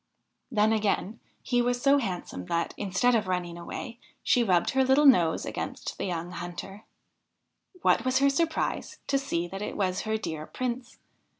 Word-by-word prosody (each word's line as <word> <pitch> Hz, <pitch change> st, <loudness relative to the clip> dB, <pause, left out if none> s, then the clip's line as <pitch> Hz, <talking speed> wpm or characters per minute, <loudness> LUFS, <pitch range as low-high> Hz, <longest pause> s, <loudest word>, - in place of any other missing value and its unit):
Then 215 Hz, -3 st, +3 dB
again, 215 Hz, 0 st, 0 dB, 0.2 s
he 245 Hz, -1 st, +2 dB
was 245 Hz, 0 st, +1 dB
so 280 Hz, +2 st, +4 dB
handsome, 180 Hz, -, -4 dB
that, 170 Hz, 0 st, -1 dB
instead 205 Hz, +5 st, +1 dB
of 220 Hz, -4 st, +1 dB
running 180 Hz, -2 st, -2 dB
away, 230 Hz, +7 st, -7 dB, 0.2 s
she 245 Hz, -, +3 dB
rubbed 180 Hz, -5 st, +2 dB
her 265 Hz, 0 st, +3 dB
little 265 Hz, +3 st, +4 dB
nose 175 Hz, -, +5 dB
against -, -, -5 dB
the -, -, -1 dB
young 175 Hz, -1 st, -3 dB
hunter. 180 Hz, +4 st, -7 dB, 1.0 s
\Vhat -, -, +4 dB
was 255 Hz, 0 st, +2 dB
her 275 Hz, +1 st, +4 dB
surprise 320 Hz, +2 st, -1 dB
to 275 Hz, -, +1 dB
see 175 Hz, -11 st, -2 dB
that 195 Hz, +2 st, -6 dB
it -, -, -4 dB
was 185 Hz, -2 st, 0 dB
her 220 Hz, 0 st, -1 dB
dear 160 Hz, -7 st, -5 dB
Prince 250 Hz, -1 st, -4 dB
215 Hz, 170 wpm, -28 LUFS, 180-255 Hz, 1.0 s, nose